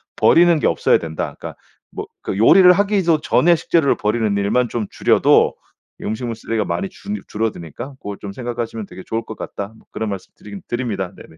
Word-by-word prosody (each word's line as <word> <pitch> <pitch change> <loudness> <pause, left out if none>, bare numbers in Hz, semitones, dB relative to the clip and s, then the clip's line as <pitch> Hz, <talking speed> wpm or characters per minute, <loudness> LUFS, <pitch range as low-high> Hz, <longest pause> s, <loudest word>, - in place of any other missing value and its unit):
버리는 170 -2 +5
게 - - +2
없어야 - - +3
된다. 80 -1 -5
그러니까 - - -8 0.3
뭐 - - -6 0.2
그 95 - -4
요리를 180 - +7
하기도 190 -4 +2
전에 170 +1 +4
식재료를 160 -3 +2
버리는 105 -1 0
일만 120 +5 +1
좀 115 -3 -2
줄여도 - - +3 0.5
음식물 115 +1 -3
쓰레기가 115 -1 -2
많이 195 - -2
줄 205 +3 -6
줄어드니까 110 - -4
고걸 100 -1 -6
좀 100 - -6
생각하시면 120 -3 -4
되게 95 - -11
좋을 115 +1 -3
것 110 - -8
같다." 100 +2 -6
뭐 - - -23
그런 110 -1 -3
말씀드리긴 100 +1 -8
드립니다. 110 -7 -3
네네. 80 - -15
115 Hz, 420 characters per minute, -20 LUFS, 100-155 Hz, 0.5 s, 요리를